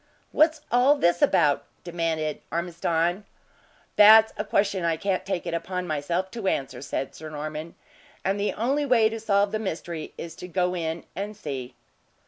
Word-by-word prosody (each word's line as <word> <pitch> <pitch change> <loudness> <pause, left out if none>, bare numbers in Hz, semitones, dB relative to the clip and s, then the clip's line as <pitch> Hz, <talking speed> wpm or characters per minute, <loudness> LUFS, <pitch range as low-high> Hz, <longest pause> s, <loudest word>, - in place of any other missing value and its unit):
"What's 310 0 +3
all 250 +4 +5
this 175 -8 +2
about?" 160 - +3 0.2
demanded 165 -3 -2
Ormiston. 170 +2 -1 0.7
"That's 220 +1 +8
a - - -2
question 200 -3 0
I 165 -1 +1
can't 190 +2 -1
take 190 -3 -2
it - - -3
upon 180 +2 -3
myself 170 +4 -2
to 230 -5 -4
answer," 135 -7 -2
said 135 -1 -4
Sir 155 0 -9
Norman; 155 +2 -6 0.5
"and 195 +1 0
the 205 - 0
only 270 +6 0
way 240 -5 +4
to 225 0 -5
solve 200 -2 +2
the 215 - -1
mystery, 170 -5 -5
is 165 -1 -7
to 180 - -8
go 180 0 0
in 165 -1 -3
and 205 +2 -5
see." 130 - -6
180 Hz, 165 wpm, -25 LUFS, 160-210 Hz, 0.7 s, That's